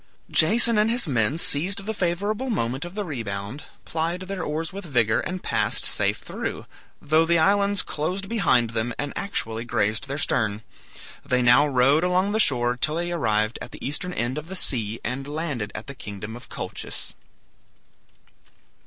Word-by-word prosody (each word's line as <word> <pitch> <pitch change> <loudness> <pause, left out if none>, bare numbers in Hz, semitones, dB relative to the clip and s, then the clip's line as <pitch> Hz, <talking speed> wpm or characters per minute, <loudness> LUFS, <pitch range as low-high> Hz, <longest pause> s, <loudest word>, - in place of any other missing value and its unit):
Jason 225 +6 +6
and 215 +1 +3
his 235 -4 0
men 125 +1 +1
seized 185 +5 +2
the 220 - -2
favorable 205 +7 -1
moment 130 - -1
of 175 +2 -9
the 210 -1 -2
rebound, 115 - -5 0.2
plied 165 +3 -2
their 185 0 -5
oars 160 +4 -3
with 200 +1 -6
vigor, 115 -8 +1
and 185 0 -4
passed - - 0
safe - - +2
through, - - -5 0.3
though 155 +2 +3
the 170 +1 +3
islands 200 +4 +3
closed 180 +6 -3
behind 160 - +2
them, 115 +1 -2
and 145 -1 -3
actually 115 - -3
grazed 110 +1 -1
their 140 +1 -3
stern. 110 -7 0 0.6
They 125 0 +1
now 125 +5 +6
rowed 140 +4 +3
along 180 +2 +2
the 220 - 0
shore 125 - +4
till 150 +4 0
they 175 +1 -2
arrived 110 -8 0
at - - -8
the - - -6
eastern 150 +6 -2
end 125 +3 -2
of 150 - -11
the 190 - -6
sea, 115 - +1
and 135 +3 -4
landed 145 -8 -3
at - - -6
the 140 - -8
kingdom 105 -3 -8
of 120 - -12
Colchis. - - -6
150 Hz, 170 wpm, -24 LUFS, 120-185 Hz, 0.6 s, Jason